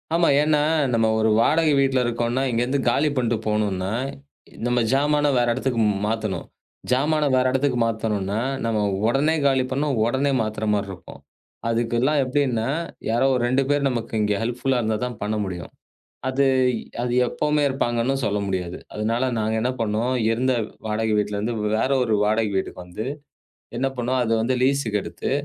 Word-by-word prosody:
ஆமா. 170 0 +3
ஏன் 150 - +3
என்றால் 150 -1 +2
நம்ம 115 -1 +3
ஒரு 110 0 +3
வாடகை 155 +3 +3
வீட்டில் 135 -1 +2
இருக்கிறோம் 120 0 -1
என்றால் 135 +2 0
இங்கிருந்து 125 +4 0
காலி 145 +5 +2
பண்ணிவிட்டு 115 -3 0
போகவேண்டும் 105 -1 +1
என்றால், 110 +9 -2 0.6
நம்ம 120 0 +2
ஜாமானை 145 +1 +2
வேறு 120 -1 +2
இடத்திற்கு 125 -2 -1 0.3
மாற்றவேண்டும். 110 -5 -2 0.4
ஜாமானை 150 +3 +2
வேறு 130 0 +3
இடத்திற்கு 130 -1 +1
மாற்றவேண்டும் 110 -2 -1
என்றால், 115 +8 -2
நம்ம 115 -2 0 0.3
உடனே 145 +6 +2
காலி 135 -2 +3
பண்ணினால், 140 -3 0
உடனே 135 +4 +1
மாத்துகிற 110 0 -3
மாதிரி 100 -1 -1
இருக்கும். 95 - -12 0.5
அதுக்கெல்லாம் 120 +5 +1
எப்படினா 130 -4 0 0.4
யாரோ 120 +4 +2 0.2
2 130 +3 +2
பேர் 145 -1 +2
நமக்கு 115 -3 -4
இங்க 105 0 +1
ஹெல்ப்புல் 125 +2 0
இருந்தால் 110 0 -1
தான் 120 -3 -6
பண்ண 105 +1 -1
முடியும். 90 -3 -6 0.6
அது 135 +1 +2 0.6
அது 120 0 -1
எப்பவுமே 150 +3 0
இருப்பாங்க 120 -3 -1
என்று 135 +3 0
சொல்ல 105 -2 0
முடியாது. 90 -2 -3 0.2
அதனால் 115 +4 0
நாங்க 110 0 0
என்ன 125 +3 0
பண்ணோம். 115 +2 0 0.2
இருந்த 125 +3 +1 0.3
வாடகை 110 0 0
வீட்டில் 105 0 -1
இருந்து 110 +4 -2 0.2
வேறு 130 +5 +1
ஒரு 115 -3 +1
வாடகை 110 0 +1
வீட்டுக்கு 95 -1 -3
வந்து 90 +5 -6 0.7
என்ன 135 +3 0
பண்ணோம். 125 +2 0
அதை 115 - -1
வந்து 125 +3 +1
லீஸ்க்கு 130 -6 +1
எடுத்து - - -5
120 Hz, 165 wpm, -23 LUFS, 110-135 Hz, 0.7 s, ஆமா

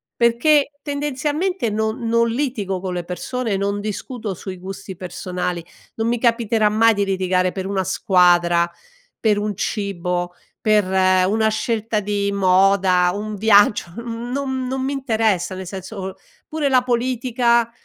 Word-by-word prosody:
perché 275 +6 +3
tendenzialmente 295 +3 -1
non 220 +3 -2
non 230 0 +2
litigo 225 -7 -2
con 185 0 -4
le 175 -1 -3
persone, 210 +5 -3
non 200 +1 -1
discuto 215 +1 -5
sui 185 +1 -7
gusti 190 +1 -8
personali; 180 -1 -4 0.3
non 225 0 -1
mi 240 0 0
capiterà 230 -2 +2
mai 225 +2 +4
di 200 -1 0
litigare 185 -1 +1
per 190 0 -5
una 195 -1 -1
squadra, 175 -2 +3 0.5
per 210 -2 +2
un 210 0 -2
cibo, 180 -3 -2 0.3
per 215 -1 +3
una 190 +3 +2
scelta 220 0 -1
di 200 0 -1
moda, 190 -1 +3
un 210 +2 -4
viaggio, 205 -1 +4
mhmm, 235 +1 -5
non 265 -1 -2
non 260 +1 -2
mi 270 +2 -1
interessa, 220 -9 0
nel 190 0 -6
senso, 190 0 -6 0.3
pure 305 -2 -1
la 255 -2 +4
politica, 240 -1 +1
210 Hz, 140 wpm, -20 LUFS, 190-235 Hz, 0.5 s, mai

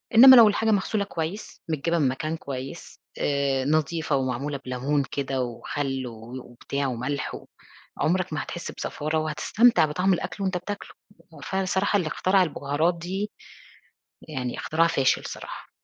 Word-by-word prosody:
إنما 260 +3 +11
لو 230 -3 +9
الحاجة 220 +2 +2
مغسولة 205 +1 +1
كويس، 175 +2 -5
متجابه 165 +2 0
من 140 - +3
مكان 155 +5 -2
كويس، 135 +3 -7 0.2
آآ، 140 -2 +1
نضيفة 155 +2 +1
ومعمولة 135 +2 -2
بلمون 135 +3 0
كده 135 -2 -2
وخل 130 +2 -3
و 120 +2 -8
وبتاع 140 +3 -4
وملح 130 +3 -3
و - - -10 0.6
عمرك 185 +1 +1
ما 155 - -1
هتحس 175 - -6
بزفارة، 155 +1 -3
وهتستمتع 155 +7 +3
بطعم 180 +6 +1
الأكْل 195 +3 -3
وأنت 190 -1 0
بتاكله، 200 +3 -6 0.4
وفعلًا 190 0 -3
الصراحة 190 +2 +1
اللي 175 - -1
اخترع 185 +5 +3
البهارات 155 +1 0
دي، 190 +5 -4 1.0
يعني 130 -5 -3
اخترع 165 +2 +2
فاشل 135 -5 +2
الصراحة. - - -8
155 Hz, 145 wpm, -25 LUFS, 135-185 Hz, 1.0 s, إنما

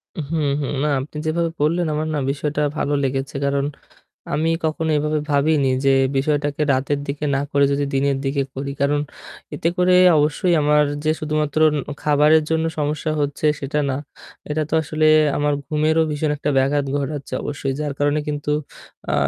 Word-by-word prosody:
হুম, 155 -1 -2
হুম। 140 - -3
না, - - +1
আপনি 150 +3 -7
যেভাবে 165 +1 0
বললেন 165 +3 +1
আমার 155 +1 -2
না 150 - 0
বিষয়টা 150 +1 -2 0.2
ভালো 145 - -1
লেগেছে। 135 +1 -2
কারণ 140 0 0 0.7
আমি 160 +2 +1
কখনো 160 0 -1
এভাবে 150 +1 0
ভাবিনি 145 -1 +2 0.2
যে 135 - +4 0.3
বিষয়টাকে 145 +1 0
রাতের 140 +2 0
দিকে 145 +2 -4
না - - 0
করে 140 0 +3
যদি 140 0 0
দিনের 135 0 +1
দিকে 140 0 0
করি। 140 +1 -4
কারণ 145 +1 +2 0.5
এতে 165 - 0
করে 180 0 +3 0.2
অবশ্যই 155 +4 +2
আমার 150 0 +4 0.2
যে 155 - +2
শুধুমাত্র 155 -1 -1 0.2
ন - - 0 0.2
খাবারের 150 +1 +4
জন্য 160 0 +1
সমস্যা 150 +1 -1
হচ্ছে 145 +1 -1
সেটা 145 +2 -1
না, 130 - -1 0.5
এটা 155 +1 0
তো - - -1
আসলে 155 +1 0 0.3
আমার 145 0 +1
ঘুমেরও 155 +2 +2
ভীষণ 150 0 -1
একটা 145 +1 -2
ব্যাঘাত 140 +2 +1
ঘটাচ্ছে 140 -1 -5
অবশ্যই। 140 -2 -3
যার 145 -2 -2
কারণে 145 +1 +1
কিন্তু 145 0 -3 0.6
আ - - +2
150 Hz, 170 wpm, -21 LUFS, 140-155 Hz, 0.7 s, যে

